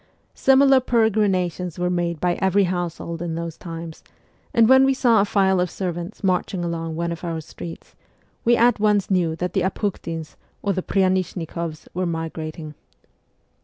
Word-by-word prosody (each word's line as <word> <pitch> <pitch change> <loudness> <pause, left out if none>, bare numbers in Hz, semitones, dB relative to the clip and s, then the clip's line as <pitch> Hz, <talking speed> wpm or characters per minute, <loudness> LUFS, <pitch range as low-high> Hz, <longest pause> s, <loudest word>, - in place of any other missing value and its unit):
Similar 270 0 +5
peregrinations 195 -8 +1
were 180 0 0
made 170 -2 -1
by 175 +1 +1
every 190 +1 +3
household 175 -2 -3
in 170 -2 -3
those 165 -1 -4
times, 165 -1 -8 0.5
and 230 -1 +5
when 265 +2 +7
we 270 0 +3
saw 235 -5 +4
a - - +2
file 190 -2 +2
of 180 0 +1
servants 175 +3 -5
marching 185 -1 0
along 165 -1 -3
one 170 +1 -2
of 170 0 -6
our 165 -2 -3
streets, 165 +2 -10 0.5
we 240 0 +4
at 240 -1 +4
once 205 -2 +2
knew 170 -4 +2
that 180 +1 -3
the 195 - +1
Apukhtins 170 -4 -3 0.3
or 200 - +1
the 185 - -1
Pryanishnikoffs 180 -4 -1
were 180 0 -1
migrating. 160 -1 -5
180 Hz, 160 wpm, -22 LUFS, 165-200 Hz, 0.5 s, when